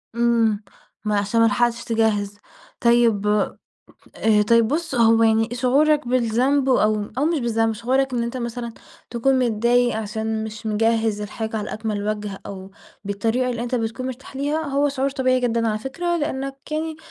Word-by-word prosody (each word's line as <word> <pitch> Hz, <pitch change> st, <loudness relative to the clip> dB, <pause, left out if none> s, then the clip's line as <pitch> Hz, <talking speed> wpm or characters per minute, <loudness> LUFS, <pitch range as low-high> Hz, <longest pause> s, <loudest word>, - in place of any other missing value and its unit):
إمم. 230 Hz, -3 st, +2 dB, 0.4 s
ما 210 Hz, -1 st, +1 dB
عشان 205 Hz, +3 st, +1 dB
ما -, -, +6 dB
لحقتش 235 Hz, +2 st, +1 dB
تجهِّز. 215 Hz, -3 st, 0 dB, 0.4 s
طيب 235 Hz, -4 st, +3 dB, 0.9 s
آآ 215 Hz, -1 st, +3 dB
طيب 230 Hz, -1 st, +4 dB
بُص، 325 Hz, +2 st, -2 dB
هو 230 Hz, -1 st, +4 dB
يعني 225 Hz, 0 st, +3 dB
شعورك 270 Hz, +3 st, +2 dB
بالذنب 255 Hz, +3 st, +1 dB
أو 215 Hz, -4 st, +2 dB
أو 280 Hz, -, +2 dB
مش 325 Hz, 0 st, +1 dB
بالذنب، 225 Hz, -2 st, +1 dB
شعورك 260 Hz, +4 st, 0 dB
إن 240 Hz, -1 st, 0 dB
أنت 235 Hz, +2 st, -4 dB
مثلًا 235 Hz, -1 st, -4 dB, 0.4 s
تكون 260 Hz, +3 st, +2 dB
متضايق 240 Hz, 0 st, +2 dB
عشان 220 Hz, 0 st, -3 dB
مش 220 Hz, 0 st, -8 dB
مجهِّز 220 Hz, 0 st, +1 dB
الحاجة 220 Hz, +2 st, -4 dB
على 210 Hz, -1 st, -4 dB
أكمل 210 Hz, -2 st, -3 dB
وَجه 210 Hz, -2 st, -4 dB
أو 190 Hz, -1 st, -8 dB, 0.3 s
بالطريقة 225 Hz, +5 st, -1 dB
اللي 235 Hz, -1 st, -3 dB
أنت 245 Hz, +1 st, -3 dB
بتكون 230 Hz, +2 st, -2 dB
مرتاح 260 Hz, +1 st, -8 dB
ليها، 290 Hz, +3 st, -1 dB
هو 285 Hz, -1 st, +1 dB
شعور 275 Hz, 0 st, -1 dB
طبيعي 255 Hz, -2 st, +1 dB
جدًا 230 Hz, -2 st, 0 dB
على 215 Hz, -1 st, -1 dB
فكرة، 345 Hz, +9 st, -2 dB
لإنّك 275 Hz, -3 st, -3 dB, 0.2 s
يعني 315 Hz, +1 st, -2 dB
235 Hz, 160 wpm, -22 LUFS, 220-260 Hz, 0.9 s, ما